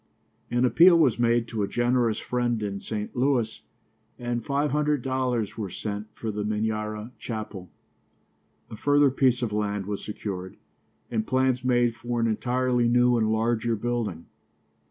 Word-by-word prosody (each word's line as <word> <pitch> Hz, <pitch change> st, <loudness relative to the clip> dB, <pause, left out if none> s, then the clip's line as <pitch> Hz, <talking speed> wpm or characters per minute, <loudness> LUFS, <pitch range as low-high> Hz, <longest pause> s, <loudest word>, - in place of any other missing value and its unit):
An 120 Hz, +1 st, +2 dB
appeal 170 Hz, +7 st, +7 dB
was 130 Hz, -8 st, +3 dB
made 120 Hz, 0 st, +2 dB
to 110 Hz, -, -3 dB
a 100 Hz, -, 0 dB
generous 120 Hz, -2 st, +1 dB
friend 120 Hz, -3 st, -1 dB
in 100 Hz, -1 st, -3 dB
St. 105 Hz, 0 st, -5 dB
Louis, 125 Hz, -3 st, 0 dB, 0.6 s
and 120 Hz, -1 st, -3 dB
five 140 Hz, +2 st, 0 dB
hundred 150 Hz, -2 st, +1 dB
dollars 125 Hz, -5 st, -1 dB
were 100 Hz, -3 st, -3 dB
sent 105 Hz, +3 st, -5 dB
for 110 Hz, -, -4 dB
the 105 Hz, 0 st, -3 dB
Minyara 110 Hz, +1 st, -2 dB
chapel. 105 Hz, -5 st, -6 dB, 1.0 s
A -, -, -6 dB
further 145 Hz, +3 st, +3 dB
piece 130 Hz, -2 st, +2 dB
of 110 Hz, -3 st, -2 dB
land 105 Hz, -2 st, -1 dB
was 100 Hz, 0 st, -4 dB
secured, 95 Hz, -3 st, -6 dB, 0.5 s
and 110 Hz, -2 st, -1 dB
plans 130 Hz, -1 st, +1 dB
made 120 Hz, -2 st, +2 dB
for 120 Hz, 0 st, -3 dB
an 115 Hz, -, +2 dB
entirely 125 Hz, +2 st, +1 dB
new 125 Hz, +1 st, +4 dB
and 110 Hz, -2 st, +1 dB
larger 115 Hz, +1 st, +1 dB
building. 110 Hz, -7 st, -3 dB
120 Hz, 155 wpm, -26 LUFS, 105-125 Hz, 1.0 s, appeal